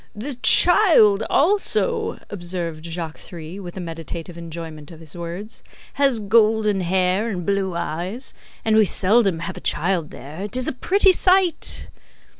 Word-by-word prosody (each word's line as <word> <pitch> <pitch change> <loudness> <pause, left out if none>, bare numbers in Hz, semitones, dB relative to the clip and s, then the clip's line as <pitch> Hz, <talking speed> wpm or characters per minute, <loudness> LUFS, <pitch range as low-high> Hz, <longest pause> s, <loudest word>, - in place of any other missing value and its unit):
"The 250 +8 -4
child 325 - +6
also," 415 - +1
observed 175 -4 -5
Jacques 165 -1 -6
Three, 170 +2 -9
with 180 -2 -9
a - - -4
meditative 165 0 -7
enjoyment 165 -3 -8
of 165 - -13
his 160 -1 -12
words, 175 +6 -7 0.3
"has 275 -5 +1
golden 215 -1 +2
hair 185 +4 0
and 180 -5 -4
blue 195 -3 -1
eyes. 175 - -5 0.3
And 220 -1 +2
we 220 -1 +5
seldom 195 -3 +2
have 170 - -6
a - - -9
child 170 -1 -1
there. 150 +6 -10
It 210 +5 -4
is 255 - -1
a - - -1
pretty 385 +9 +3
sight!" 370 -1 +1
190 Hz, 150 wpm, -21 LUFS, 170-225 Hz, 0.3 s, child